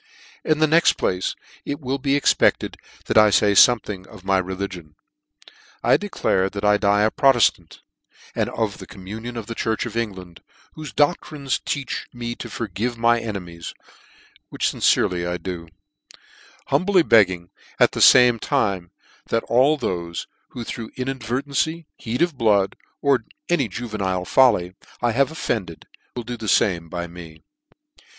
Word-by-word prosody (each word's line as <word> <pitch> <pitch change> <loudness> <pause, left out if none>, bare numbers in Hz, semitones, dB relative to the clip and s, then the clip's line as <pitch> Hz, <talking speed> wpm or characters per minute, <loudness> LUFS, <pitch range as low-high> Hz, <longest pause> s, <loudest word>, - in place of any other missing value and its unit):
In 155 - +1
the 155 - +4
next 165 +2 +4
place, 90 0 -2 0.3
it 145 - -4
will 135 -1 -3
be 140 +1 +1
expected 145 - +2 0.3
that - - +4
I 110 0 +6
fay 105 0 +3
fomething 100 -3 +4
of 105 -4 -14
my 95 -1 +2
religion. 95 -3 -6 0.9
I - - +5
declare, 95 - 0
that 100 +1 -5
I 105 0 +5
die 105 0 +2
a 110 - +2
Proteftant, 120 - +2 0.5
and - - -1
of - - -3
the - - -10
communion 110 +6 -8
of 115 - -5
the 115 - -6
church 110 0 -2
of 115 -2 -7
England, 95 -7 -5 0.3
whofe 155 -2 -9
doclririe 145 -1 0
teaches 140 -2 -3
me 120 -1 -5
to 120 - -8
forgive 115 +2 -4
my 120 0 +3
enemies, 90 -7 -7 0.7
which - - -1
lincerely 90 -1 +1
I 90 0 -2
do; 85 -1 -6 1.0
humbly 185 -2 +3
begging, 90 - +3 0.3
at - - +5
the - - -4
fame 125 -3 +7
time 95 -5 -1 0.4
that 115 - 0
all 135 +6 +3
thofe, 85 -9 -4 0.2
who 120 - -7
through 115 0 -6
inadvertency, 135 +5 -2
heat 120 +6 -2
of 170 -4 -1
blood, 105 -5 +2 0.3
or 140 -3 +3 0.3
any 145 -8 +2
juvenile 100 -5 -3
folly, 95 -9 +3 0.3
I 120 -1 +1
have 135 +4 +2
of 160 - -10
fended, 90 -8 -3 0.3
will 120 - -4
do 120 +1 -6
the 110 - -7
fame 85 -5 +2
to 85 0 -4
me. 85 -2 -12
110 Hz, 155 wpm, -22 LUFS, 95-130 Hz, 1.0 s, fame